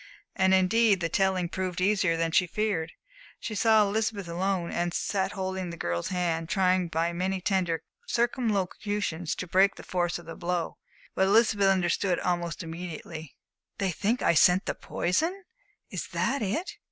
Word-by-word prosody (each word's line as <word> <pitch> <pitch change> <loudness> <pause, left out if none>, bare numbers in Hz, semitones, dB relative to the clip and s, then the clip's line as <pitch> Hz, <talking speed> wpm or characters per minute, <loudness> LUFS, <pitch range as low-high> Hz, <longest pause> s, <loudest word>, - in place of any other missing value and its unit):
And 190 0 +3
indeed 195 +2 +4
the 165 -2 -1
telling 190 0 +1
proved 185 0 -3
easier 185 -3 +2
than 165 0 0
she 180 +2 +3
feared. 185 -5 -1 0.5
She 220 - -5
saw 220 +1 +4
Elizabeth 205 -1 -1
alone, 175 0 -1
and 175 0 -1
sat 195 -1 -1
holding 190 -2 -3
the 170 - -7
girl's 85 - -2
hand, 170 -3 -1
trying 185 -2 +2
by 165 +1 -1
many 185 +2 -1
tender 180 -4 0 0.2
circumlocutions 205 - -1
to - - -4
break 190 +3 +3
the - - -11
force 175 -1 -1
of 175 - -12
the 165 - -7
blow. 175 -1 -3 0.3
But 190 - +2
Elizabeth 210 -1 +4
understood 185 -1 +2
almost 175 -2 -2
immediately. 165 -2 -7 0.4
"They 195 -2 0
think 220 +8 -1
I - - +4
sent 180 +3 +5
the - - -1
poison 330 - -1 0.5
is - - -4
that 275 0 -1
it?" 220 - -2
185 Hz, 160 wpm, -28 LUFS, 170-200 Hz, 0.5 s, sent